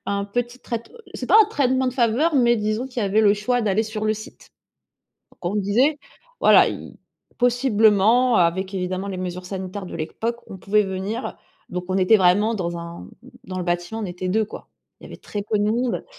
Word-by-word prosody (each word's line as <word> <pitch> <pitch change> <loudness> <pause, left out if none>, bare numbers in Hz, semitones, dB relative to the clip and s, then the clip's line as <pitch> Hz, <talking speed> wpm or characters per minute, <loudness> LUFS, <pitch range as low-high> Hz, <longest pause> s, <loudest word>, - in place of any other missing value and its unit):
à - - -1
un 200 0 -1
petit 240 +4 -3
traite 235 -2 -6 0.2
c'est - - -5
pas - - +5
un 425 - -3
traitement 260 - +1
de 255 - -1
faveur 255 +6 +2
mais 240 -3 +4
disons 215 +3 -2
qu'il 250 -3 -4
y - - +1
avait 200 +2 +2
le 205 -2 +5
choix 240 +4 0
d'aller 210 +1 +1
sur 215 -1 -5
le 215 - +2
site. 215 - -12 0.8
Donc - - -21
on - - -2
disait, 235 +10 +2 0.4
voilà, - - +6
i - - -8 0.4
possiblement 240 -1 +3
avec 185 +3 +1
évidemment 185 +1 -3
les 190 - -4
mesures 180 0 -5
sanitaires 190 0 -6
de - - -8
l'époque, 225 +9 -3
on 195 - -8
pouvait 210 +3 +2
venir 195 +5 -4 0.3
donc 180 0 -4
on 185 - 0
était 190 +4 +5
vraiment 205 +4 +3
dans 175 -3 -3
un 170 0 -9 0.4
dans 185 0 -6
le 180 - -3
bâtiment, 175 +5 -2
on - - -3
était 180 +1 -5
2, 215 +3 +1
quoi. - - -11 0.3
Il - - -13
y - - -9
avait - - -10
très 205 - -6
peu 210 +1 -1
de 205 - +1
monde. 235 +3 -1
210 Hz, 210 wpm, -22 LUFS, 185-235 Hz, 0.8 s, voilà